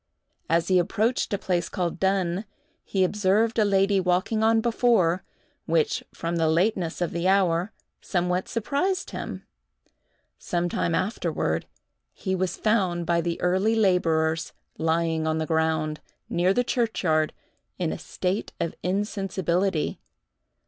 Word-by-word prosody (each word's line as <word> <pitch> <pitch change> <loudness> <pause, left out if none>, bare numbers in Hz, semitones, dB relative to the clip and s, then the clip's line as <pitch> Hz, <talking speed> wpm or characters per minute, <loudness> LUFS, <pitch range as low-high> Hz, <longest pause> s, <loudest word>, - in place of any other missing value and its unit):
As 165 +1 +2
he 185 -1 +5
approached 220 +7 0
a 200 - +1
place 175 -3 -1
called 180 -3 -2
Dunn, 190 0 0 0.4
he 190 -2 0
observed 210 +4 +2
a - - +5
lady 195 -1 +3
walking 185 +4 +1
on 225 0 +4
before, 220 -7 +2 0.4
which, 160 -2 +1
from 170 +1 -3
the 165 -1 +2
lateness 175 +1 +1
of 175 - 0
the 170 +2 -1
hour, 190 0 +2 0.3
somewhat 180 0 -1
surprised 290 - -1
him. - - -6 0.9
Sometime 175 -1 -1
afterward, 190 +6 -1 0.5
he 190 - -3
was 185 -1 -1
found 185 -6 +1
by 170 0 +2
the 170 0 -2
early 190 +5 +2
laborers 165 -6 +2 0.3
lying 160 0 +1
on 160 0 +1
the 160 - -1
ground, 160 -1 0 0.3
near 175 +2 +2
the 245 +5 +2
churchyard, 185 -11 +1 0.5
in 175 -3 -1
a - - -6
state 185 +3 -3
of 165 - -1
insensibility. 190 -3 -1
180 Hz, 130 wpm, -25 LUFS, 170-200 Hz, 0.9 s, he